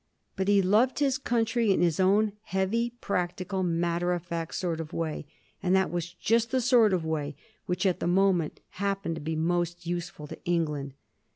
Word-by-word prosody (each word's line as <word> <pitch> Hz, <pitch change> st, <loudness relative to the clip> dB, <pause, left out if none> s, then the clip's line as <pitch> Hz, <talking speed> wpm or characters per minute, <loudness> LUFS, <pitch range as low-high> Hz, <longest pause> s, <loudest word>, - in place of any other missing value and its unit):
But 190 Hz, 0 st, -1 dB
he 200 Hz, -1 st, +4 dB
loved 215 Hz, +8 st, +3 dB
his 275 Hz, -2 st, +1 dB
country 230 Hz, -3 st, +1 dB
in 190 Hz, -, +3 dB
his 170 Hz, -1 st, +1 dB
own 200 Hz, +3 st, +3 dB
heavy, 195 Hz, +5 st, 0 dB
practical, 185 Hz, +1 st, -2 dB
matter 175 Hz, 0 st, 0 dB
of 175 Hz, -2 st, -3 dB
fact 170 Hz, -2 st, -4 dB
sort 170 Hz, -3 st, -2 dB
of 160 Hz, 0 st, -6 dB
way, 155 Hz, -3 st, -3 dB, 0.3 s
and 185 Hz, -1 st, +2 dB
that 190 Hz, 0 st, +2 dB
was 175 Hz, 0 st, -3 dB
just 225 Hz, +6 st, +1 dB
the 260 Hz, -, +1 dB
sort 240 Hz, -3 st, +5 dB
of 180 Hz, -4 st, 0 dB
way 150 Hz, -2 st, -2 dB, 0.3 s
which, 180 Hz, +1 st, -1 dB
at 185 Hz, -2 st, +2 dB
the -, -, -1 dB
time, 180 Hz, -3 st, +3 dB, 0.2 s
happened 195 Hz, -3 st, -2 dB
to 160 Hz, -, -6 dB
be 160 Hz, +2 st, -2 dB
most 175 Hz, +2 st, -1 dB
use 175 Hz, 0 st, -2 dB
ful 150 Hz, -5 st, -11 dB
to -, -, -10 dB
England. 150 Hz, -6 st, -1 dB
180 Hz, 190 wpm, -28 LUFS, 170-200 Hz, 0.3 s, sort